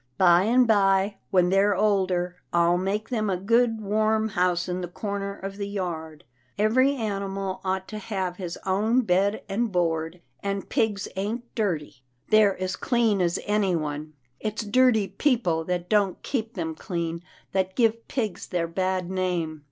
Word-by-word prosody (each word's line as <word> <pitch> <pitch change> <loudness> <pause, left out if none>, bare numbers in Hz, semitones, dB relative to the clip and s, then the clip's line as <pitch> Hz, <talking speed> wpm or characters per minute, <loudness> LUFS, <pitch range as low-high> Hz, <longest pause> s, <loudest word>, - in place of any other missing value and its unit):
By 180 0 +5
and 245 +3 +4
by, 195 -2 +3
when 180 -2 +3
they're 195 +2 +3
older, 185 -3 +1
I'll 170 +1 +3
make 205 +4 -2
them 215 -4 0
a 185 - 0
good, 230 +4 +2
warm 215 +1 +1
house 180 -2 +1
in 180 0 -2
the 175 - -3
corner 200 +2 -4
of 195 +1 -7
the 200 -1 -3
yard. 165 -6 -5 0.3
Every 255 +7 +3
animal 195 -4 -3
ought 190 0 -2
to 215 - -5
have 190 -4 -3
his 180 -3 -5
own 215 +6 +2
bed 200 0 +1
and 225 +3 -1
board, 165 -1 -1 0.2
and 200 0 -3
pigs 210 -3 0
ain't 225 +5 -4
dirty. 160 - -2 0.3
They're 210 -3 +5
as 185 +1 -2
clean 225 -4 +1
as 170 -1 +1
anyone. 160 -7 -1 0.3
It's 215 +1 -3
dirty 220 -2 +4
peo 280 +2 +2
ple, 165 -8 -1
that 180 0 -2
don't 205 -3 +1
keep 230 -4 -3
them 165 -4 -3
clean, 170 -1 -4 0.3
that 190 -1 -1
give 230 -1 +1
pigs 220 -7 -3
their 170 -2 -1
bad 185 +1 -1
name." 180 -4 -2
195 Hz, 160 wpm, -26 LUFS, 180-215 Hz, 0.3 s, By